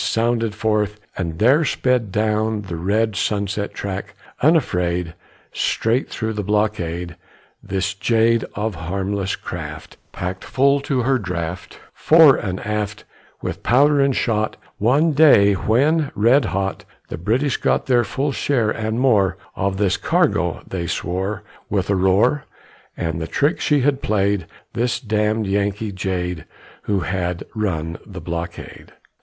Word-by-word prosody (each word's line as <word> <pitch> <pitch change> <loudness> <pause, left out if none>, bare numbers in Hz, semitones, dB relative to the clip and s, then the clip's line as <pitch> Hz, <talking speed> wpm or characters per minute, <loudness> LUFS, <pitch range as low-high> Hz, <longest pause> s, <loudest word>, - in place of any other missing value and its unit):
Sounded 115 -1 0
forth, 105 -1 0 0.2
and 85 -4 -3
there 130 - +4
sped 125 -6 0
Down 110 +1 0
the 90 -3 -6
red 105 +5 0
Sunset 100 +1 -1
track, 100 +1 -5 0.3
unafraid, 90 - +1 0.4
Straight 115 +4 0
through 110 -1 -3
the 105 - -2
blockade, 90 -5 -1 0.5
This 95 0 -2
jade 115 +3 +2
Of 105 +1 -2
a - - -10
harmless 100 +2 -2
craft, - - -8
Packed 90 +1 -5
full 140 +2 +2
to 135 -2 -1
her 130 +1 +2
draught, 90 -3 -5
Fore 160 -3 +6
and 95 -3 -3
aft, 105 0 -3 0.4
With - - -4
powder 145 +4 +4
and 140 -2 +2
shot, 110 -2 0 0.2
One 140 +10 +3
day 140 -10 +6
when, 140 - +2
red 120 +5 +4
hot 95 -1 -2 0.3
The - - -5
British 125 - 0
got - - +1
Their 125 -2 +3
full 135 +7 -2
share 125 -5 0
and 110 +1 -2
more 100 -8 +3 0.2
Of 95 0 -1
this 100 -2 +1
cargo, 155 - +1
they 85 -3 -4
swore, 95 +5 -3 0.3
With 100 -1 0
a - - +3
roar, 100 +10 +2 0.5
At 80 -1 -2
the 80 - -4
trick 145 - +1
she 145 -2 +2
had 140 +1 +1
played, 100 -4 0 0.3
This 120 +1 0
"damned 110 -1 0
Yankee 100 +2 -1
jade" 90 -3 -3 0.4
Who 100 -2 0
had 90 +1 -2
run 85 -7 -2
the 95 -4 -9
blockade! 85 0 -7
105 Hz, 140 wpm, -21 LUFS, 95-120 Hz, 0.5 s, Fore